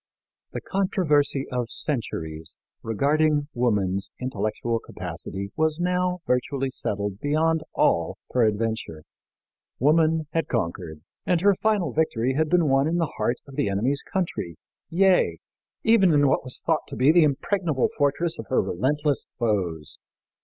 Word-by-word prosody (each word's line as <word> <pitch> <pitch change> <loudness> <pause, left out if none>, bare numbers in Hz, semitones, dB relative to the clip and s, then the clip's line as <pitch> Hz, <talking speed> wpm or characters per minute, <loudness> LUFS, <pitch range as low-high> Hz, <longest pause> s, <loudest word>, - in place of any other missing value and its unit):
" - - -66
The - - -4
controversy 150 -8 +1
of 125 -2 -2
centuries 80 - -3 0.3
regarding 145 +6 +1
woman's 100 -6 0
intellectual 115 -1 -2
capacity 100 -2 -7
was 155 0 +1
now 180 0 0
virtually 135 +1 0
settled 100 -4 -3
beyond 155 +3 +1
all 85 0 +2 0.2
peradventure. 110 -8 0 0.7
Woman 155 +3 +3
had 165 0 -1
conquered, 85 -7 -3 0.3
and 175 -2 +2
her 200 +1 +5
final 195 - 0
victory 130 -5 +1
had 155 +3 +1
been 175 -2 +3
won 135 +1 +3
in 170 +2 0
the 165 -4 -1
heart 120 +3 0
of 135 - -11
the 100 - 0
enemy's 120 +8 0
country, 165 - -3 0.3
yea, 185 +1 +3 0.5
even 220 -6 +5
in 145 -1 +4
what 135 - +2
was 130 -1 -5
thought 160 -2 +1
to 140 - -6
be 135 +4 +5
the 170 0 +6
impregnable 155 0 +1
fortress 145 +4 +1
of 110 - -7
her - - +2
relentless 140 - 0
foes. 90 - -2
140 Hz, 140 wpm, -25 LUFS, 110-160 Hz, 0.7 s, the